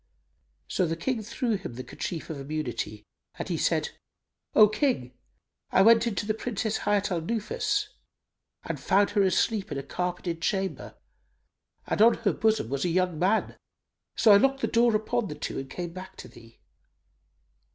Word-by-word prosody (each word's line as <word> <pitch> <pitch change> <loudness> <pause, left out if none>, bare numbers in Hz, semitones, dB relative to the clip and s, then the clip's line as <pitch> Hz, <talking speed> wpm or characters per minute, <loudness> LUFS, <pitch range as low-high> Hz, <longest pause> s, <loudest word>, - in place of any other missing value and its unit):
So 180 - 0
the 165 - -1
King 230 +7 -2
threw 230 +1 -1
him 180 -11 -8
the 130 - -6
kerchief 165 +3 -5
of 150 - -6
immunity 120 -8 -4 0.3
and - - -5
he - - -1
said, - - 0 0.6
"O 215 - +9
King, 215 - -1 0.6
I 190 - +4
went 230 +2 +6
into 205 -3 -2
the 215 - 0
Princess 220 -1 -2
Hayat 205 -1 0
al 170 -2 0
Nufus 215 +5 -1 0.7
and - - -4
found 200 +1 +2
her 205 -1 +2
asleep 195 +2 +1
in 145 - -3
a 140 - -4
carpeted 180 -1 -3
chamber 190 +1 -2 0.9
and - - -1
on 230 +1 +7
her 220 -4 0
bosom 220 - +1
was 140 +1 -2
a 180 - +1
young 180 -2 0
man. 195 +5 +1 0.6
So 220 - +5
I 200 - +9
locked 270 +4 +2
the - - +1
door 235 -1 +3
upon 220 +1 0
the 150 - -6
two 150 - -4
and 135 0 -7
came 175 +1 -5
back 185 +1 -9
to - - -9
thee." 115 0 -17
195 Hz, 170 wpm, -27 LUFS, 165-220 Hz, 0.9 s, O